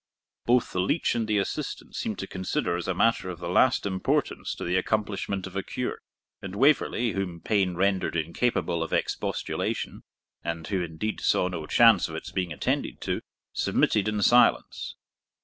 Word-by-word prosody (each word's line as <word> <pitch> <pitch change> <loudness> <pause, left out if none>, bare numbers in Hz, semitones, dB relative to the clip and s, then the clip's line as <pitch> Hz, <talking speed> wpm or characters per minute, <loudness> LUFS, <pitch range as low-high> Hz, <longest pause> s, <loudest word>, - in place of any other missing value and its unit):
] - - -64
both 125 0 +3
the 90 - -2
leech 95 - +1
and 115 -2 -1
the 105 -1 +2
assistants 100 - -3
seemed - - -2
to - - -4
consider 95 -2 -2
as 85 - -4
a 95 - +1
matter 110 -2 +2
of 90 - -5
the 85 0 -6
last 120 +8 +3
importance 95 -2 -1
to - - -6
the 90 - 0
accomplishment 100 0 -1
of 95 -1 -9
a 100 - 0
cure; 125 +5 -4 0.4
and 95 0 -6
Waverley, 125 -2 +3
whom 95 -4 -3
pain 95 0 +1
rendered 95 -1 +1
incapable 85 +1 0
of 80 - -3
expostulation, - - -2 0.4
and 85 -1 -3
who 95 -3 0
indeed 85 +6 -3
saw 90 - +3
no 85 -4 -5
chance 115 -8 +5
of 80 - -6
its 80 - -6
being 90 -3 -2
attended 75 - -1
to, - - -2 0.3
submitted 105 -2 +2
in 105 -1 0
silence. 120 +3 +3
95 Hz, 175 wpm, -27 LUFS, 90-110 Hz, 0.4 s, chance